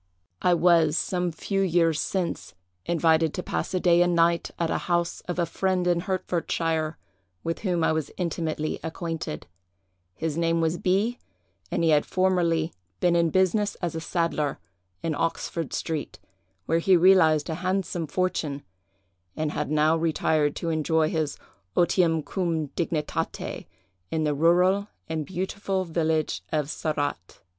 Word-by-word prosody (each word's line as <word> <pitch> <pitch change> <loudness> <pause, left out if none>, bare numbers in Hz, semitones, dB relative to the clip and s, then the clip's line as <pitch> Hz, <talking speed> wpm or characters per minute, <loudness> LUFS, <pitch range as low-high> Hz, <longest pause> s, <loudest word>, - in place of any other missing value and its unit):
"I 180 -1 +4
was, 165 -2 +4
some 180 -1 0
few 195 +5 -2
years 165 -4 +2
since, 185 - -3 0.3
invited 160 -2 +2
to 180 - -3
pass - - -3
a - - +2
day 175 -1 +4
and 175 0 +3
night 170 0 +3
at 170 - 0
the - - 0
house 175 0 0
of 175 - -3
a 175 - +2
friend 185 +2 0
in 175 -1 +2
Hertfordshire, 165 -3 -1 0.5
with 165 0 -2
whom 180 -5 0
I - - +3
was 160 -2 -1
intimately 160 -3 -2
acquainted. 165 - -4 0.7
His 160 - -2
name 165 0 +2
was 165 +1 0
B——, 205 +7 +1 0.5
and - - -1
he 165 - +4
had 150 -1 +3
formerly 175 -4 +1 0.3
been 175 -1 +3
in 170 -1 +3
business 190 +4 +2
as 175 -3 -3
a 160 - -4
saddler, 165 -4 -1 0.5
in 165 - 0
Oxford 165 0 -2
street, 160 -3 -3 0.5
where 165 - +2
he 185 +2 +5
realized 165 -4 +5
a 165 - -2
handsome 185 -3 -1
fortune, 150 -4 -1 0.7
and 155 -1 -1
had 150 -1 -2
now 155 +1 +3
retired 155 -2 +1
to 165 - -2
enjoy 160 0 +1
his 155 -3 -1 0.4
otium 170 -3 +3
cum 165 -6 -1
dignitate, 165 -1 -3 0.4
in 160 -1 -1
the 150 -1 +1
rural 180 +6 +3 0.2
and 160 -2 -3
beautiful 190 +1 -2
village 160 -2 0
of 150 -2 0
Sarratt. 145 - -3
165 Hz, 150 wpm, -26 LUFS, 155-180 Hz, 0.7 s, he